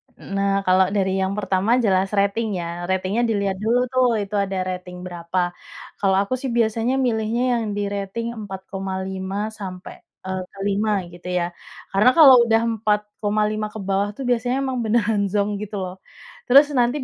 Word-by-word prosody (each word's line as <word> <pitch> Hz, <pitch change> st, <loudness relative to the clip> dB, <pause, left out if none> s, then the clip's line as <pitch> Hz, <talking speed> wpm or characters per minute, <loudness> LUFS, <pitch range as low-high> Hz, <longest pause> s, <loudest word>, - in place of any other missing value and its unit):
Eee, -, -, -13 dB
nah, 195 Hz, 0 st, +1 dB
kalau 185 Hz, 0 st, +4 dB
dari 190 Hz, -1 st, +1 dB
yang 190 Hz, +1 st, 0 dB
pertama 195 Hz, +1 st, 0 dB
jelas 195 Hz, -2 st, +2 dB
rating 200 Hz, +3 st, +1 dB
ya. 170 Hz, +1 st, -5 dB
Ratingnya 190 Hz, +4 st, 0 dB
dilihat 200 Hz, -3 st, 0 dB
dulu 225 Hz, +4 st, +2 dB
tuh, 255 Hz, -1 st, +3 dB, 0.2 s
itu 200 Hz, +1 st, -6 dB
ada 195 Hz, -1 st, -1 dB
rating 180 Hz, -1 st, -6 dB
berapa. 175 Hz, 0 st, -2 dB, 0.5 s
Kalau 195 Hz, -1 st, +2 dB
aku 200 Hz, -, -4 dB
sih 270 Hz, -, -3 dB
biasanya 230 Hz, +2 st, +1 dB
milihnya 235 Hz, -2 st, 0 dB, 0.2 s
yang -, -, -2 dB
di 205 Hz, -, -1 dB
rating 200 Hz, +3 st, -3 dB
4,5 190 Hz, 0 st, -4 dB
sampai, 185 Hz, -2 st, -7 dB, 0.3 s
eee, 190 Hz, 0 st, -3 dB, 0.2 s
5 205 Hz, -1 st, 0 dB
gitu 175 Hz, +1 st, -12 dB
ya. 175 Hz, -1 st, -1 dB, 0.4 s
Karena 200 Hz, +5 st, +5 dB
kalau 280 Hz, -5 st, +10 dB
udah 225 Hz, 0 st, +3 dB
4,5 210 Hz, 0 st, -1 dB
ke 220 Hz, -, -6 dB
bawah 195 Hz, +1 st, 0 dB
tuh 270 Hz, -, -6 dB
biasanya 245 Hz, +3 st, +1 dB
emang 260 Hz, -2 st, -2 dB
beneran 215 Hz, -2 st, +1 dB
zonk 205 Hz, +1 st, -1 dB
gitu 210 Hz, 0 st, -6 dB
loh. 180 Hz, 0 st, -6 dB, 0.5 s
Terus 280 Hz, +4 st, +7 dB
nanti 255 Hz, +1 st, +1 dB
200 Hz, 160 wpm, -22 LUFS, 190-225 Hz, 0.5 s, kalau